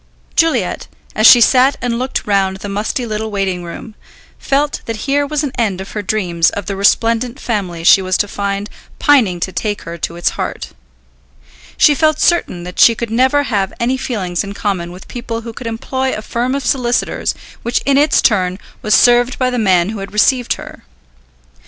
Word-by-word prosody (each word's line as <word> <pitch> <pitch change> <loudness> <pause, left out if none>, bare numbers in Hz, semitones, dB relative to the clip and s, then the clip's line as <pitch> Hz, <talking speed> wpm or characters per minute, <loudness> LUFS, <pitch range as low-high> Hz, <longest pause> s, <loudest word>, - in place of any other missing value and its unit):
Juliet, 330 -1 +1 0.3
as 215 +1 +6
she 245 - +9
sat 260 +3 +4
and 240 -1 -2
looked 255 +1 -3
round 195 -2 +1
the 200 - -7
musty 210 +5 -2
little 220 0 -3
waiting 195 -3 -2
room, 175 +6 -9 0.5
felt 285 +1 0
that 230 - -3
here 285 +1 +1
was 300 0 -1
an 285 - -2
end 200 -5 0
of 190 - -8
her 210 - -4
dreams 180 -5 +1
of 205 - -6
the 200 +1 -4
resplendent 230 +5 +1
family 185 -10 -3
she 190 - +6
was 185 0 0
to 205 - 0
find 200 0 -3 0.3
pining 235 - +3
to 190 - -2
take 205 +1 -3
her 170 0 -8
to 165 - -4
its 175 - 0
heart. - - -5 1.1
She 300 - +5
felt 310 +1 +1
certain 265 - +1
that 180 +1 -8
she 230 - +6
could 230 0 -5
never 260 +5 +2
have 200 -7 -1
any 245 +2 +1
feelings 195 -9 -3
in 200 0 -7
common 185 -5 -2
with 180 +2 -12
people 230 -2 -5
who 230 0 -8
could 235 - -7
employ 260 +3 -2
a 215 - -6
firm 245 +4 -2
of 280 -2 -4
solicitors 245 -2 0 0.3
which 235 +1 -1
in 275 - +3
its 295 0 +3
turn 185 -5 +2 0.2
was 215 0 +3
served 245 +1 +4
by 255 -1 0
the 250 - -1
man 185 -4 +2
who 215 -1 -5
had 195 +1 -8
received 245 +3 +2
her. - - -11
220 Hz, 195 wpm, -16 LUFS, 195-255 Hz, 1.1 s, she